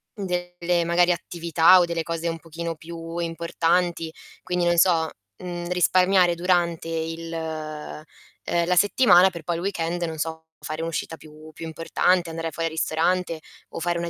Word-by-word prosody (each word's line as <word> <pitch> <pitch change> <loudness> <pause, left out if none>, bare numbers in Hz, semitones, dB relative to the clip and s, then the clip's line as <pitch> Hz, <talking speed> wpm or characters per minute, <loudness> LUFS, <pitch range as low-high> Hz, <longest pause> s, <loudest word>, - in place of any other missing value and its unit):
delle 175 -2 -1
magari 175 +1 +3
attività 170 +1 +4
o 175 - +4
delle 170 -1 -2
cose 165 0 -3
un 165 0 -2
pochino 165 0 -5
più 165 +1 -8
importanti. 170 0 0 0.3
Quindi 180 -1 -1
non 175 0 +2
so, 165 -2 +4 0.3
mhmm, 175 -1 -6
risparmiare 180 0 +3
durante 170 -2 0
il 165 0 -4
uhm, 155 -2 -6 0.6
la 180 +1 +1
settimana 190 -1 +6
per 170 -3 -9
poi 170 +1 -2
il 170 - -4
weekend 175 -2 -2
non 160 -1 -3
so, 160 +1 -4
fare 155 +1 -5
un'uscita 165 0 -3
più 155 0 -14
più 165 - -8
importante, 165 +2 +1
andare 165 0 -4
fuori 165 +2 -2
al - - -11
ristorante, 165 +1 0 0.3
o - - -6
fare 170 0 -1
una 170 0 -3
170 Hz, 160 wpm, -24 LUFS, 165-175 Hz, 0.6 s, settimana